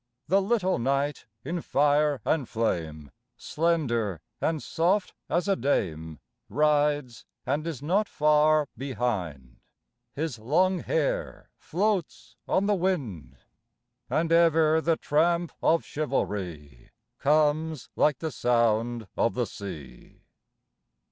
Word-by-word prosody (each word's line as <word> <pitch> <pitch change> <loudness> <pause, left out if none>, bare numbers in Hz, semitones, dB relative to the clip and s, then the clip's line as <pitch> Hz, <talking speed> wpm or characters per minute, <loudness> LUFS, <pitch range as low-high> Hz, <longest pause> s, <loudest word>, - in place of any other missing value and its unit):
The 195 +1 +3
little 190 - +1
knight 140 +3 -1 0.2
in 170 0 -3
fire 145 -2 +2
and 145 -7 0
flame, 80 -10 -2 0.3
Slender 125 - 0 0.2
and 160 -2 -1
soft 180 +4 0 0.2
as 175 +2 0
a 195 - +3
dame, 80 - -2 0.3
Rides 145 -1 +1 0.2
and 150 +4 -1
is 145 -5 -5
not 195 +7 +1
far 150 0 +3
behind: 105 - -4 0.6
His 150 -5 -3
long 175 +11 +2
hair - - -2
floats 195 -2 -2
on 195 - +2
the 210 - +2
wind. 125 - -2 0.7
And 165 +1 0
ever 160 -1 +4
the 165 0 +1
tramp 170 +3 +1
of 165 +1 +2
chivalry 90 - -4 0.3
Comes 155 0 +1
like 150 -3 +3
the 160 +2 -4
sound 115 -2 +1
of 115 - +1
the 125 -1 0
sea. 75 - -10
150 Hz, 110 wpm, -27 LUFS, 115-165 Hz, 0.7 s, ever